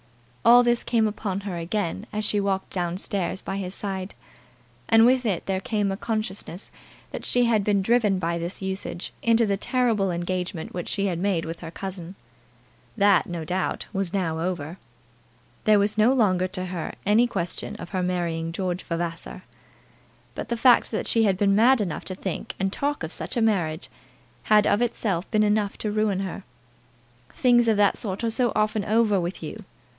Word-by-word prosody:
All 245 +1 +8
this 240 0 +1
came 225 -2 +2
upon 200 -2 -3
her 195 -3 -5
again 190 +4 -3
as 215 0 -2
she 210 - +1
walked 195 -1 -1
down 175 -1 -2
stairs 190 -2 -2
by 195 - -4
his 190 -1 -3
side; 190 -1 -4 0.7
and 225 0 +7
with 250 0 +3
it 190 -5 -1
there 190 -1 -1
came 210 -5 0
a - - -1
consciousness 205 -3 -4 0.4
that - - -6
she 245 - +2
had 220 -3 +2
been 200 -1 +2
driven 220 -3 +3
by 170 -1 -1
this 175 +3 -5
usage 190 -1 -4
into 230 0 +4
the 200 -2 0
terrible 225 -4 +1
engagement 175 -1 -3
which 175 -1 -4
she 200 -1 -1
had 175 -4 -1
made 185 -3 0
with 165 +1 -6
her 165 - -7
cousin. 185 0 -7 0.8
That, 200 -3 +4
no 170 -2 -4
doubt, 185 +3 -2
was 195 -3 -1
now 170 -5 -1
over. 170 -1 -3 0.9
There 215 -1 +6
was 205 +2 +1
no 220 +4 +5
longer 190 -8 +2
to 185 0 -4
her 180 -3 -5
any 220 +4 +4
question 180 -7 -4
of - - -8
her 185 -2 -2
marrying 170 -2 -1
George 180 0 -2
Vavasor. 170 0 -5 0.9
But - - -6
the 235 - -1
fact 245 +1 +5
that 220 - -2
she 225 -1 +3
had 195 -3 +2
been 200 0 +3
mad 245 +4 +5
enough 190 -7 -3
to 185 - -3
think 190 -1 -5
and 195 0 0
talk 285 - -2
of 160 - -5
such - - -4
a - - +2
marriage, 175 -8 0 0.6
had 210 -1 +5
of 205 - +2
itself 205 -6 -1
been 215 -1 +3
enough 210 -1 +1
to 210 - -2
ruin 210 -2 +1
her. 195 0 -5 0.9
"Things 240 -2 +3
of 220 -2 +3
that 205 -1 +3
sort 195 0 -4
are 230 - +1
so 240 0 +2
often 215 0 +1
over 215 -1 +2
with 175 +2 -4
you!" - - -7
195 Hz, 190 wpm, -25 LUFS, 180-215 Hz, 0.9 s, All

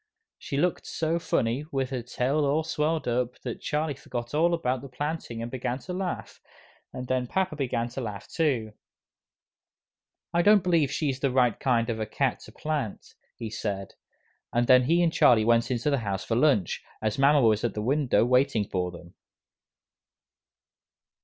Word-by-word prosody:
She 140 - -4
looked 175 +4 0
so 165 +1 -1
funny, 120 -3 0
with 135 -1 -1
her 130 -2 -2
tail 130 +5 0
all 145 +3 +1
swelled 155 -1 -1
up, 125 0 -1
that 120 -3 -5
Charlie 150 0 -1
forgot 120 -2 -6
all 170 +3 +3
about 130 -6 -1
the 140 - -9
planting 125 -3 -4
and 120 - -6
began 125 -1 -2
to 180 +7 -7
laugh, 185 -1 -4 0.5
and 125 0 -6
then 130 -1 0
papa 185 +3 -1
began 125 -4 -1
to 130 +3 -5
laugh 105 -4 -6
too. 130 -10 0 1.6
"I 170 - +3
don't 205 0 +5
believe 165 -6 +2
she's 140 -4 -1
the 140 - +1
right 125 -3 +2
kind 120 -4 +1
of 115 -2 -2
a 110 - -2
cat - - 0
to - - -13
plant," 150 -9 -4 0.2
he 115 -2 -6
said, 100 -3 -4 0.6
and 120 +1 +2
then 125 0 +6
he 170 +5 +3
and 165 -1 +2
Charlie 110 -3 +5
went 115 0 +3
into 125 +3 0
the 140 - +2
house 100 -4 -3
for 115 - -1
lunch, 120 - +2 0.2
as 110 +2 -2
mama 145 +2 +5
was 110 -4 +3
at 120 - -1
the 105 - -2
window 135 -1 +2
waiting 125 -4 +2
for 90 -1 -1
them. 85 0 -12
130 Hz, 175 wpm, -27 LUFS, 115-150 Hz, 1.6 s, then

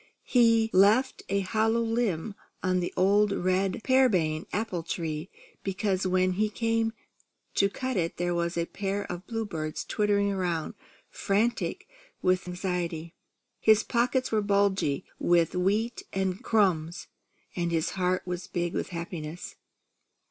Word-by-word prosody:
He 230 -2 +4
left 210 +8 +4
a 200 0 +1
hollow 220 +4 +1
limb 225 -5 -1 0.3
on 185 0 +2
the 175 - -2
old 200 +2 +4
red 185 +1 0
pearmain 185 -13 +2
apple 205 -4 -2
tree, 160 0 -4 0.3
because 195 -1 -1
when 185 0 +2
he 210 +4 +1
came 225 0 0 0.6
to 200 - +3
cut 255 +4 -3
it 165 -2 -1
there 175 0 0
was 170 0 -1
a 170 - +1
pair 200 +2 -3
of 180 +1 -7
bluebirds 185 -10 -3
twittering 205 -1 +1
around, 175 -4 -2 0.4
frantic 215 +4 -1 0.4
with 185 0 +2
anxiety. 175 -2 -3 0.5
His 220 -1 +5
pockets 250 +2 0
were 215 -1 +2
bulgy 200 -6 +1
with 170 -2 +3
wheat 205 +6 0
and 190 +3 -2
crumbs, 180 -8 +1 0.5
and 170 -1 -1
his 165 0 0
heart 185 -1 0
was 180 0 -4
big 175 -1 -2
with - - -2
happiness. 170 -2 -6
190 Hz, 135 wpm, -28 LUFS, 175-215 Hz, 0.6 s, His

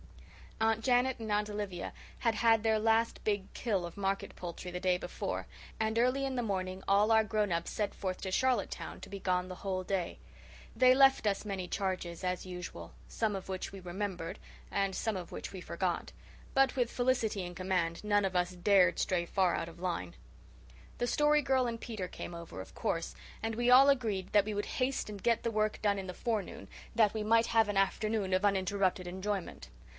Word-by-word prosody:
Aunt 225 0 +2
Janet 250 +1 +3
and 220 -2 -4
Aunt 210 0 +1
Olivia 205 -4 -4 0.3
had 230 -2 +1
had 225 -1 +4
their 220 -1 +2
last 225 +1 +2
big 205 -2 -1
"kill" 205 -7 0
of 170 - -9
market 195 0 -2
poultry 175 +1 -6
the 180 - -4
day 185 0 +2
before; - - -4 0.3
and 220 0 0
early 255 +3 +2
in 265 -1 -2
the 245 - 0
morning 185 -3 -3
all 205 +3 +4
our 220 0 +6
grown 215 -2 0
ups 170 0 -1
set 210 -2 -1
forth 185 -2 -3
to 190 - -3
Charlottetown, 260 +5 0
to - - -9
be 200 - -6
gone 180 -1 0
the 185 - -7
whole 185 0 -3
day. 185 -2 -2 0.6
They 255 0 +6
left 270 -2 +5
us 200 0 0
many 195 -3 -3
charges 185 -3 -3
as 180 0 -1
usual, 175 - -7
some 220 -3 -1
of 190 - -6
which 185 -1 -4
we 195 - -8
remembered 185 -1 -4 0.3
and 195 -1 0
some 220 -3 -1
of 180 - -7
which - - -6
we 190 - -7
forgot; - - -2 0.4
but 270 +1 +4
with 245 -3 +1
Felicity 240 -6 +1
in 175 0 -6
command 180 -2 -1
none 205 -1 +3
of 190 -1 -2
us 180 0 +2
dared 180 -1 +4
stray 175 -2 +1
far 185 0 +2
out 165 - -3
of 170 +1 -14
line. 170 - -3 0.8
The 245 - 0
Story 295 +3 +4
Girl 260 -2 +2
and 230 -1 -4
Peter 215 -6 -4
came 175 - -7
over, 170 - -8
of 95 - -12
course, 165 0 -2 0.3
and 225 0 -2
we 240 +2 +1
all 265 +3 +8
agreed 220 -9 0
that 205 -1 +5
we 215 - -3
would 205 - -1
haste 260 -3 0
and 205 -2 -7
get 235 -1 +2
the 230 - -1
work 215 -1 0
done 205 -1 +2
in 190 - -6
the 185 - -5
forenoon, 220 -1 -3 0.3
that 220 -2 +4
we 215 - -1
might 225 +2 +4
have 225 -1 +4
an 205 - -1
afternoon 200 0 +1
of 185 +2 +2
uninterrupted 190 -2 +1
enjoyment. 190 - -4
200 Hz, 205 wpm, -32 LUFS, 185-225 Hz, 0.8 s, all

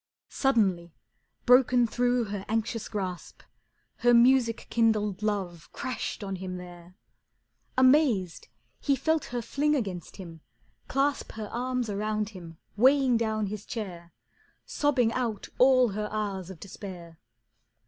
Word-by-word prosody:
Suddenly, 190 - +1 0.5
broken 250 -1 +5
through 245 +1 +1
her 200 -2 -5
anxious 225 0 -2
grasp, 185 -5 -5 0.5
Her 240 0 +4
music 240 -1 +4
kindled 210 -4 +1
love 185 -7 -3
crashed 255 -4 -4
on 195 -1 -4
him 185 0 -5
there. 175 0 -12 0.8
Amazed, 255 - +3 0.3
he 280 - +1
felt 315 +3 0
her 240 -1 -4
fling 295 +6 +1
against 190 - -4
him, 165 -4 -10 0.5
clasp 275 +1 -1
Her 215 -2 -6
arms 250 0 -2
about 210 +1 -2
him, 170 -6 -11 0.2
weighing 260 +2 +4
down 220 -2 0
his 205 +1 -5
chair, 180 -8 -7 0.5
Sobbing 255 -6 +1
out 230 -5 -3
all 255 -1 +5
her 210 +1 -3
hours 200 -4 -3
of 185 -4 -10
despair. 180 -4 -10
215 Hz, 125 wpm, -28 LUFS, 190-250 Hz, 0.8 s, broken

